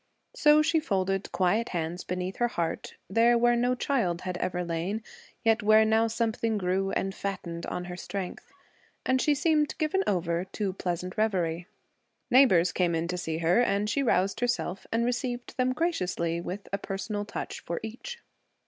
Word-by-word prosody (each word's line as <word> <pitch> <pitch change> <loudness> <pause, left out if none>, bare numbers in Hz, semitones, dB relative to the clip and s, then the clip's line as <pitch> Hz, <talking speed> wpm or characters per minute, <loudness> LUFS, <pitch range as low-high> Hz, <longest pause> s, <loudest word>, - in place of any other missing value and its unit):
So 300 0 +5
she 325 +1 +3
folded 195 -7 -1
quiet 200 +6 +1
hands 170 0 -3
beneath 180 +1 -4
her 240 - +2
heart, 170 -8 -3
there 230 +5 +4
where 240 0 +4
no 245 +1 +2
child 215 -10 0
had 185 -1 -4
ever 180 0 -2
lain, 175 +6 -2 0.4
yet 225 -1 +3
where 215 +1 +6
now 220 +1 +3
something 225 -1 0
grew 190 0 0
and 195 0 -1
fattened 175 -4 -5
on 180 0 -4
her 180 0 -6
strength. 185 0 -6 0.5
And 260 0 +2
she 295 - +3
seemed 300 0 +1
given 320 +5 +1
over 170 -2 0
to 195 0 -3
pleasant 180 -1 -4
revery. 175 -5 0 0.6
Neighbors 185 -10 +6
came 175 -2 +1
in 165 +1 -1
to 180 - -1
see 160 -2 -3
her, 180 +8 +5
and 205 -3 +1
she 210 +7 +1
roused 195 -5 +1
herself 240 -6 -1
and 230 +1 +1
received 245 0 -3
them 255 0 +2
graciously, 180 - -1
with 190 +3 -6
a 200 - 0
personal 205 +2 -3
touch 210 - -5
for 170 - -4
each. 360 - -7
200 Hz, 170 wpm, -28 LUFS, 180-240 Hz, 0.6 s, where